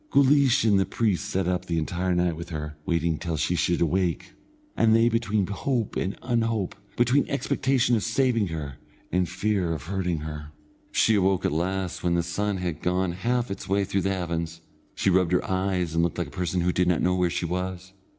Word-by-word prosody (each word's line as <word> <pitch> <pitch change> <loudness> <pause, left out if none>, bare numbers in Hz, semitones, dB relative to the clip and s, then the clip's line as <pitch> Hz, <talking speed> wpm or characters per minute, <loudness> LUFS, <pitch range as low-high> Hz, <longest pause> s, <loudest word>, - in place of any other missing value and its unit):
Guleesh 140 -1 +4
and 105 -3 +4
the 95 - +2
priest 105 -4 0
sat 95 -3 0
up 90 -1 -1
the 85 - -1
entire 90 +3 -1
night 90 -1 +1
with 85 +2 -8
her, 75 -2 -5
waiting 85 -2 0
till 85 -3 -3
she 75 +4 0
should 85 +1 +1
awake, 90 +1 0 0.4
and 110 -1 +4
they 115 +1 +5
between 110 -3 0
hope 115 +4 -2
and 95 +3 -2
unhope, 115 -5 0 0.2
between 120 +4 +3
expectation 130 -3 +1
of 110 - 0
saving 115 -1 +1
her 75 -5 -6 0.3
and 90 0 +1
fear 95 -2 0
of 80 - -5
hurting 90 -3 -2
her. 75 0 -7 0.4
She 110 - +3
awoke 95 -2 +2
at - - +2
last 90 +3 -2
when 85 -1 +2
the 85 - +1
sun 100 +4 -1
had 90 -4 -3
gone 90 0 0
half 120 +5 -1
its 100 - -6
way 100 +1 +2
through 95 0 -1
the 95 - 0
heavens. 85 -3 -3 0.3
She 95 - +2
rubbed 90 -1 +2
her 90 - +1
eyes 95 -3 -1
and 85 - +2
looked 85 -1 0
like - - -2
a - - -17
person 90 0 -1
who 90 +1 +2
did 90 0 +2
not 90 -2 +2
know 90 - +3
where 90 -1 +2
she 85 - -2
was. 90 +1 -4
90 Hz, 210 wpm, -26 LUFS, 85-105 Hz, 0.4 s, they